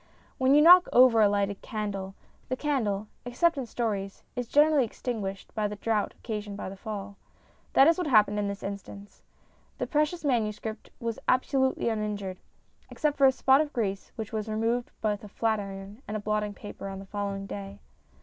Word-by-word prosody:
When 260 +2 +4
you 300 - +7
knock 360 +2 +9
over 245 -2 +6
a 210 - +6
lighted 200 -1 -1
candle, 195 -3 -4 0.3
the 255 - 0
candle 220 -8 -1 0.2
(except 320 +8 +1
in 265 -4 -4
stories) 205 -4 -3
is 245 -2 -3
generally 295 +1 +4
extinguished 210 -4 -5
by 215 -1 0
the 210 - -5
draught 210 0 -1
occasioned 210 -3 -5
by - - -5
the 195 - -8
fall. 200 -1 -7 0.6
That 270 - +7
is 330 +3 +4
what 355 - -1
happened 210 -5 +4
in 205 - 0
this 200 0 -5
instance. 200 0 -8 0.6
The - - -2
precious 305 +2 0
manuscript 220 -4 -1
was 230 -1 -3
absolutely 265 0 +2
uninjured, 210 -4 -3 0.5
except 300 -2 0
for 275 - +6
a - - +6
spot 265 +2 +4
of 300 -1 -3
grease 200 -5 -2
which 220 -1 -6
was 215 0 -3
removed 230 +3 0
with 210 -1 0
a - - -8
flat 220 +1 0
iron 195 +3 -8
and 210 0 -4
blotting 210 -1 -1
paper 205 -1 -8
on 195 0 -6
the 195 - -9
following 200 0 -4
day. 200 0 -7
215 Hz, 180 wpm, -28 LUFS, 200-255 Hz, 0.6 s, knock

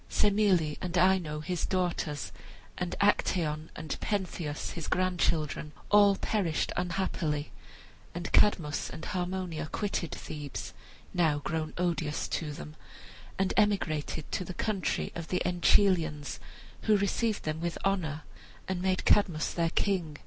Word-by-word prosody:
Semele 195 -7 +3
and 180 -1 -2
Ino, 175 -4 +3
his 180 +2 -2
daughters, 175 -5 -1 0.4
and 180 -1 -3
Actaeon 160 -6 +2
and 155 0 -5
Pentheus, 180 -7 -2
his 165 -3 -5
grandchildren, 170 -4 0 0.2
all 205 -1 +7
perished 190 -6 0
unhappily, 170 -4 -1 0.6
and 175 +1 -4
Cadmus 160 -8 +3
and - - -7
Harmonia 180 -3 -2
quitted 200 -5 -1
Thebes, 145 -2 -6 0.4
now 160 -4 +3
grown 155 +1 -3
odious 170 -4 0
to 155 -3 -2
them, 75 - -8 0.6
and 195 -1 +1
emigrated 165 -8 +1
to - - -1
the 180 0 -7
country 210 -4 -1
of 165 -1 -5
the 180 - 0
Enchelians, 175 -4 +3 0.5
who 215 -1 +5
received 210 +2 0
them 155 +1 -2
with 170 0 -2
honor 160 -6 0 0.4
and 185 -1 -2
made 185 0 0
Cadmus 180 -7 +3
their 165 -1 +1
king. 175 -5 0
175 Hz, 125 wpm, -30 LUFS, 155-190 Hz, 0.6 s, all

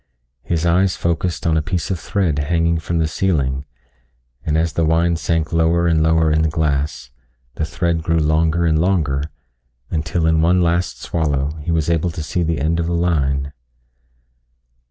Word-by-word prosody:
His 80 +5 -1
eyes 90 +2 +2
focused 85 -1 -2
on 80 -1 +2
a - - +2
piece 90 +3 -3
of 90 - -2
thread 85 -8 -1
hanging 85 +2 +1
from 85 +1 -3
the 80 -1 +1
ceiling, 70 -6 -1 0.8
and 80 0 0
as 80 -1 0
the 85 - 0
wine 85 +2 +2
sank 80 -1 -1
lower 85 +1 +2
and 80 -2 +2
lower 80 0 +3
in 80 +1 +2
the 80 - +1
glass, 75 -4 -2 0.4
the 80 - -2
thread 80 +3 -1
grew 80 +1 0
longer 80 +2 +2
and 80 -1 +2
longer 80 -6 +1 0.7
until 80 +1 -1
in 80 0 +3
one 90 +3 +3
last 85 +1 0
swallow 75 -3 -1
he 75 - -6
was 80 -3 +1
able 85 +1 +1
to 80 -1 -5
see 90 +3 -2
the 80 -2 -1
end 80 +3 0
of 85 - -1
the 85 - -1
line. 70 -5 0
80 Hz, 175 wpm, -19 LUFS, 75-85 Hz, 0.8 s, lower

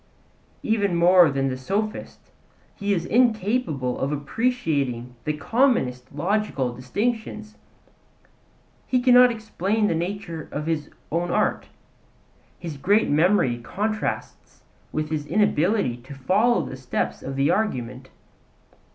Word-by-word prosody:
Even 205 -5 +1
more 175 0 +6
than 135 -1 0
the 130 - -2
sophist 200 +11 -4 0.4
he 200 0 -2
is 170 -4 0
incapable 215 - +1
of 135 - -1
appreciating 145 - -1
the 150 - 0
commonest 150 - +1
logical 160 - -1
distinctions; 215 - -3 1.3
he 255 - +2
cannot 250 0 +7
explain 220 -2 -1
the 210 - +2
nature 170 -2 -4
of 150 +1 -4
his 155 -2 -2 0.2
own 170 +2 -1
art; - - 0 0.9
his 165 -5 -7
great 205 +9 +2
memory 150 -6 +3
contrasts 215 - -4 0.3
with 155 0 -3
his 150 -2 -2
inability 195 - +1
to 130 +3 -12
follow 205 - +2
the 135 - -7
steps 130 -1 -3
of 135 +1 -5
the 140 +1 +2
argument. 130 - -2
170 Hz, 115 wpm, -24 LUFS, 135-215 Hz, 1.3 s, cannot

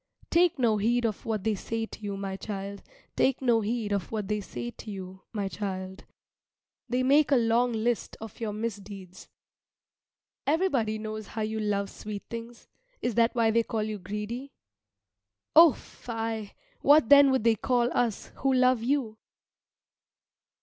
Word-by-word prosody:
Take 340 -1 +4
no 230 -5 +2
heed 235 +3 +1
of 220 -1 -3
what 215 -4 -1
they 220 0 +1
say 225 +3 -3
to - - -11
you, 200 -2 -4
my 195 -1 -4
child. 200 0 -6 0.3
Take 265 -1 +2
no 240 -4 +3
heed 220 0 -2
of 200 -3 -2
what 210 -3 -3
they 210 0 0
say 120 -9 -6
to 215 - -11
you, 190 -1 -8
my 205 -3 -2
child. 190 -1 -5 0.8
They 250 +1 +1
make 285 +3 +4
a - - +6
long 240 +1 +3
list 230 +1 -1
of 220 -2 -9
your 225 -2 -2
misdeeds. 200 -4 -7 1.2
Everybody 280 - +1
knows 215 -1 -6
how 220 - -5
you 220 +1 -2
love 200 -2 -1
sweet 210 -1 -7
things 230 0 -8 0.4
is 245 - 0
that 230 +2 +2
why 230 -2 +3
they 230 +1 +3
call 225 -1 -2
you 215 -1 -4
greedy? 210 +8 -5 1.0
O, 325 -2 +9
fie! 225 -3 -6 0.3
What 290 -4 +5
then 285 -1 +8
would 260 -4 +1
they 230 -1 +5
call 240 +2 +1
us 235 -4 -1
who 270 - +1
love 255 -2 +4
you? 235 -3 -1
225 Hz, 160 wpm, -28 LUFS, 205-245 Hz, 1.2 s, O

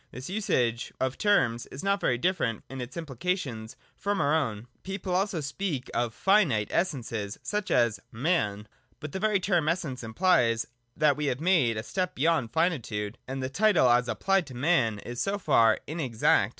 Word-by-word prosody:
This 130 +8 -8
usage 125 - 0
of 130 0 +1
the - - -18
term 160 - +3
is 135 - -7
not 200 0 +1
very 120 - +2
different 125 - -1
in 135 -1 -5
its 125 +4 -7
implication 140 - -3 0.3
from 200 0 -1
our 145 0 +2
own. 115 -9 -1 0.2
People 190 -1 -4
also 185 -2 0
speak 145 -2 -3
oi 120 0 +1
Jinite 145 - +2
Essences, 115 - -2
such 210 -1 -2
as 120 -3 +2
man. 110 - -1 0.3
But 155 - -7
the 190 - -4
very 210 -1 +2
term 175 -5 +1
Essence 150 -8 -2
implies 115 -3 +2 0.3
that 150 -2 +3
we 150 -1 -1
have 130 -1 -1
made 155 -10 +2
a 110 - -3
step 185 +6 -2
beyond 140 -5 +1
finitude: 120 - -1
and 135 0 -4
the - - -1
title 200 - +4
as 120 0 +3
applied 195 +7 +1
to 130 - -10
man 125 -6 +2
is 120 +4 -6
so 200 +1 0
far 115 - +4
in 160 +3 -5
exact. 120 -7 +2
140 Hz, 180 wpm, -28 LUFS, 120-185 Hz, 0.3 s, title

